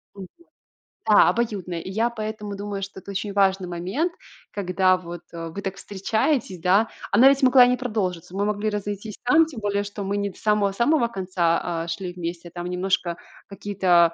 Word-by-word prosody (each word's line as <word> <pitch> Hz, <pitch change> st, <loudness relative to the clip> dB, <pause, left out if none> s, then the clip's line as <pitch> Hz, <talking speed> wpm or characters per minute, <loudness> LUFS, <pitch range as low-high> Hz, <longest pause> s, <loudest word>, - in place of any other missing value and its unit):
Мгм. 190 Hz, -2 st, -8 dB, 0.8 s
Да, 210 Hz, -, +7 dB
обоюдная. 200 Hz, -7 st, -2 dB
И 175 Hz, -, -7 dB
я 225 Hz, +5 st, +1 dB
поэтому 215 Hz, -3 st, -5 dB
думаю, 200 Hz, 0 st, -4 dB
что 195 Hz, 0 st, -7 dB
это 200 Hz, -, -9 dB
очень 200 Hz, +1 st, -3 dB
важный 195 Hz, -2 st, +2 dB
момент, 185 Hz, -, -2 dB, 0.4 s
когда 185 Hz, -1 st, +2 dB
вот, 175 Hz, -1 st, -8 dB
э, 165 Hz, -1 st, -6 dB
вы 195 Hz, +5 st, -6 dB
так 195 Hz, -1 st, -4 dB
встречаетесь, 205 Hz, -, -1 dB
да. 195 Hz, +6 st, +3 dB, 0.2 s
Она 240 Hz, +7 st, +7 dB
ведь 275 Hz, 0 st, +2 dB
могла 255 Hz, -1 st, +8 dB
и -, -, +3 dB
не 250 Hz, -, +2 dB
продолжиться. 195 Hz, -8 st, -3 dB
Мы 200 Hz, +1 st, 0 dB
могли 210 Hz, +1 st, 0 dB
разойтись 205 Hz, +1 st, -4 dB
там, 310 Hz, +7 st, +5 dB
тем 275 Hz, -9 st, -9 dB
более 205 Hz, 0 st, 0 dB
что 205 Hz, 0 st, -6 dB
мы 200 Hz, +1 st, -1 dB
не 200 Hz, 0 st, -1 dB
до -, -, -19 dB
самого-самого 215 Hz, +6 st, +2 dB
конца, 185 Hz, -6 st, 0 dB, 0.2 s
а, -, -, -7 dB
шли 180 Hz, +1 st, -4 dB
вместе, 175 Hz, 0 st, -6 dB
а -, -, -25 dB
там 175 Hz, 0 st, -6 dB
немножко, 180 Hz, -1 st, 0 dB, 0.3 s
какие-то, 185 Hz, -4 st, +2 dB
200 Hz, 185 wpm, -24 LUFS, 180-215 Hz, 0.8 s, могла